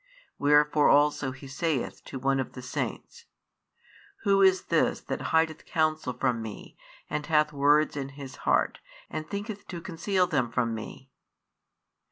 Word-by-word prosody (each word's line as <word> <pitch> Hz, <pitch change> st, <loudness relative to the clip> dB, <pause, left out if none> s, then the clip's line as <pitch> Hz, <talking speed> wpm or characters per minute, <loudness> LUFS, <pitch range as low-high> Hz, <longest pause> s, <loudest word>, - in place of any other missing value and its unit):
Wherefore 150 Hz, +1 st, +4 dB
also 145 Hz, -1 st, +3 dB
He 130 Hz, +2 st, -11 dB
saith 145 Hz, -1 st, -2 dB
to -, -, -6 dB
one 135 Hz, +1 st, +1 dB
of 130 Hz, -, -3 dB
the 125 Hz, -, -9 dB
saints: 470 Hz, -, -5 dB, 1.0 s
Who 200 Hz, -2 st, +4 dB
is 190 Hz, -1 st, +5 dB
this 165 Hz, -2 st, +1 dB
that -, -, -4 dB
hideth 160 Hz, -1 st, +1 dB
counsel 155 Hz, -5 st, 0 dB
from 125 Hz, -2 st, 0 dB
Me, 110 Hz, -2 st, -8 dB, 0.3 s
and 150 Hz, 0 st, -3 dB
hath 150 Hz, -2 st, +3 dB
words 145 Hz, +2 st, +3 dB
in 135 Hz, -1 st, -4 dB
his 135 Hz, -2 st, -8 dB
heart, -, -, +1 dB, 0.3 s
and 155 Hz, 0 st, -5 dB
thinketh 205 Hz, 0 st, -5 dB
to 175 Hz, -, -6 dB
conceal 185 Hz, +2 st, 0 dB
them 130 Hz, -9 st, 0 dB
from 115 Hz, -1 st, 0 dB
Me? 130 Hz, +4 st, -8 dB
150 Hz, 150 wpm, -28 LUFS, 135-165 Hz, 1.0 s, is